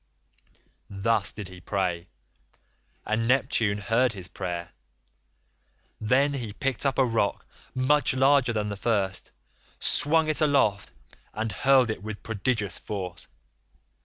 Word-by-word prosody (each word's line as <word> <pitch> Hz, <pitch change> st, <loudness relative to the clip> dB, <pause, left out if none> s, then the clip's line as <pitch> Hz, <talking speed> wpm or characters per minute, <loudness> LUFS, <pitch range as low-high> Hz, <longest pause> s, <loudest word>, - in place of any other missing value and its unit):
'82 100 Hz, -1 st, -8 dB
"Thus 110 Hz, -4 st, +2 dB
did 100 Hz, -4 st, -7 dB
he 90 Hz, -1 st, -12 dB
pray, 90 Hz, -2 st, -2 dB, 1.0 s
and 110 Hz, +2 st, 0 dB
Neptune 120 Hz, -5 st, +2 dB
heard 115 Hz, +4 st, +1 dB
his 95 Hz, -3 st, -7 dB
prayer. 90 Hz, -2 st, -5 dB, 1.3 s
Then 130 Hz, +6 st, +2 dB
he 120 Hz, -7 st, -4 dB
picked 135 Hz, +3 st, -1 dB
up 135 Hz, -, -1 dB
a 135 Hz, -, +4 dB
rock 115 Hz, -4 st, 0 dB, 0.3 s
much 130 Hz, +2 st, +2 dB
larger 135 Hz, -1 st, +4 dB
than 105 Hz, -2 st, -1 dB
the 100 Hz, -, -3 dB
first, 100 Hz, -3 st, -1 dB, 0.5 s
swung 160 Hz, +1 st, +2 dB
it 155 Hz, +1 st, +1 dB
aloft 135 Hz, -10 st, +2 dB, 0.4 s
and 110 Hz, 0 st, -2 dB
hurled 130 Hz, +3 st, +4 dB
it 110 Hz, -, -6 dB
with 105 Hz, 0 st, -7 dB
prodigious 110 Hz, -1 st, -1 dB
force. 90 Hz, -4 st, -6 dB
110 Hz, 130 wpm, -26 LUFS, 100-130 Hz, 1.3 s, a